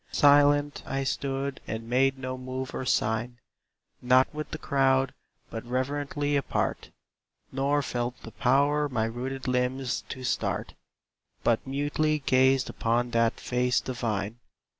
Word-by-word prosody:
Silent 145 Hz, 0 st, +4 dB
I 135 Hz, 0 st, -1 dB
stood 135 Hz, 0 st, -2 dB
and 110 Hz, +1 st, -5 dB
made 135 Hz, +2 st, +2 dB
no 130 Hz, 0 st, -4 dB
move 130 Hz, 0 st, -5 dB
or 130 Hz, -, -3 dB
sign; 110 Hz, +2 st, 0 dB, 0.6 s
Not 130 Hz, +3 st, +4 dB
with 155 Hz, 0 st, -5 dB
the -, -, -5 dB
crowd, 135 Hz, -2 st, +2 dB, 0.4 s
but 115 Hz, -, -5 dB
reverently 145 Hz, +3 st, -1 dB
apart; 140 Hz, -, -1 dB, 0.6 s
Nor 140 Hz, +2 st, +1 dB
felt 120 Hz, -1 st, -3 dB
the 115 Hz, -, -9 dB
power 145 Hz, +4 st, +2 dB
my 120 Hz, -4 st, 0 dB
rooted 130 Hz, +4 st, -4 dB
limbs 125 Hz, 0 st, 0 dB
to 130 Hz, -2 st, -6 dB
start, 125 Hz, -, -1 dB, 0.7 s
But 115 Hz, +2 st, +1 dB
mutely 145 Hz, +3 st, 0 dB
gazed 130 Hz, -1 st, +3 dB
upon 120 Hz, +1 st, 0 dB
that 115 Hz, -1 st, +2 dB
face 125 Hz, 0 st, +1 dB
divine. 115 Hz, -3 st, -3 dB
130 Hz, 130 wpm, -28 LUFS, 125-140 Hz, 0.7 s, Silent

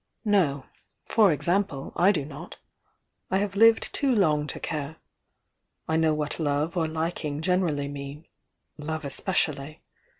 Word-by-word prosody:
"No. 165 Hz, -10 st, +2 dB, 0.4 s
For 210 Hz, -5 st, +4 dB
example, 170 Hz, -2 st, -1 dB
I 190 Hz, +3 st, +5 dB
do 155 Hz, -8 st, -2 dB
not. 150 Hz, +4 st, -10 dB, 0.7 s
I 190 Hz, -, +2 dB
have 200 Hz, 0 st, -2 dB
lived 225 Hz, +2 st, +5 dB
too 275 Hz, -3 st, +1 dB
lonp 150 Hz, -7 st, +2 dB
to -, -, -4 dB
care. 155 Hz, -1 st, -4 dB, 0.9 s
I 160 Hz, -, 0 dB
know 160 Hz, -1 st, +3 dB
what 150 Hz, +1 st, -2 dB
love 150 Hz, +2 st, 0 dB
or 165 Hz, -2 st, +1 dB
liking 160 Hz, -2 st, -3 dB
generally 170 Hz, -6 st, +1 dB
mean 140 Hz, +2 st, -7 dB, 0.3 s
— -, -, -53 dB
love 155 Hz, +1 st, -4 dB
especially. 150 Hz, -1 st, -1 dB
160 Hz, 140 wpm, -26 LUFS, 145-185 Hz, 0.9 s, I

